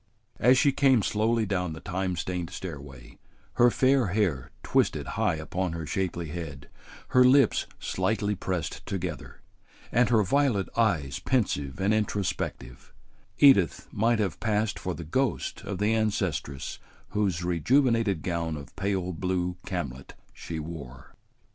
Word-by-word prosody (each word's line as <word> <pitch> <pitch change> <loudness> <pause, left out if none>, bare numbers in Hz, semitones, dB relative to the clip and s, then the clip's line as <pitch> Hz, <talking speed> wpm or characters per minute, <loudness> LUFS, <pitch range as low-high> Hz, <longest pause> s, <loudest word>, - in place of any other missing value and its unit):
As 125 +2 +5
she 145 0 +4
came 130 -5 +4
slowly 110 +2 +1
down 90 -4 -1
the 80 - -8
time 95 +1 -2
stained 90 0 -3
stairway, 70 -8 -9 0.4
her 120 0 +7
fair 130 0 +3
hair 90 - 0
twisted - - +1
high - - 0
upon 85 +3 -3
her 85 -1 -4
shapely 85 0 -2
head, 75 -4 -7 0.4
her 125 - +6
lips 130 -1 +4
slightly 105 -1 -1
pressed 90 -4 -3
together, 90 -6 -5 0.5
and 120 0 +3
her 110 -3 +4
violet 120 -2 +1
eyes 85 - +1
pensive 95 - -1
and 100 +3 +2
introspective, 105 -3 -3 0.5
Edith 100 - +5
might 115 +3 +2
have 100 -7 -1
passed 110 -1 0
for 90 -2 -3
the 85 - -7
ghost 125 - -1
of 100 - -4
the 105 +3 +1
ancestress 95 -11 -2 0.3
whose 95 -5 0
rejuvenated 110 - +2
gown 85 -3 -2
of 70 - -11
pale 95 -2 -1
blue 90 +1 -2
camlet 70 -8 -5 0.2
she 80 - -6
wore. 75 -5 -8
95 Hz, 135 wpm, -27 LUFS, 85-110 Hz, 0.5 s, her